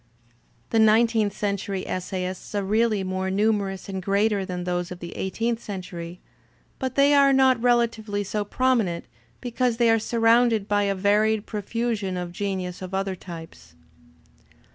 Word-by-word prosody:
The 225 - +3
nineteenth 220 -1 +3
century 200 -2 -2
essayists 185 +1 -4
are 200 - 0
really 215 0 +1
more 185 0 -2
numerous 200 -1 0
and 190 -1 -4
greater 200 +2 +1
than 180 -2 -4
those 175 -1 -2
of 180 - -7
the 170 -1 -8
eigh 190 - -2
teenth 230 +3 -2
century, 180 -3 -7 0.6
but 260 -1 -3
they 280 +1 +5
are 280 -1 +6
not 265 -3 +4
relatively 230 -4 +1
so 210 +1 -2
prominent 220 -6 0 0.4
be 245 - -5
cause 245 -1 0
they 235 -1 +4
are 225 - +3
surrounded 230 -1 +3
by 205 -1 +2
a 200 0 0
varied 210 +2 +2
profusion 210 -2 -2
of 175 -1 -4
genius 185 -1 -4
of 185 +1 -5
other 195 0 -1
types. 160 - -11
205 Hz, 155 wpm, -24 LUFS, 185-230 Hz, 0.6 s, are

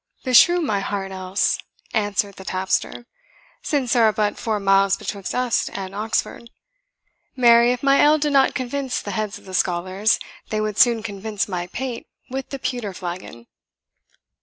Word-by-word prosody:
"Beshrew 345 +7 +6
my 215 -11 0
heart 195 -1 -4
else," 185 +1 0 0.3
answered 205 -1 0
the 190 - -9
tapster, 190 +5 -2 0.6
"since 270 -5 0
there 235 -3 +4
are 215 - +5
but 210 -1 -1
four 220 -2 -1
miles 195 0 +3
betwixt 200 -2 -5
us 250 -2 0
and 195 -1 -6
Oxford. 220 +2 -3 0.9
Marry, 235 -1 +6
if 250 +1 -3
my 275 0 +5
ale 300 +1 +5
did 295 -1 -1
not 270 -1 +4
convince 260 +1 -2
the 205 - -6
heads 210 +1 -3
of - - -18
the 190 - -10
scholars, 185 +4 +1 0.3
they 215 - -1
would 215 -1 -2
soon 235 -3 +4
convince 205 0 -3
my 175 -3 -4
pate 245 +4 -5 0.2
with 265 0 -4
the 275 - -5
pewter 245 -7 -4
flagon." 175 -10 -7
215 Hz, 160 wpm, -22 LUFS, 195-250 Hz, 0.9 s, Beshrew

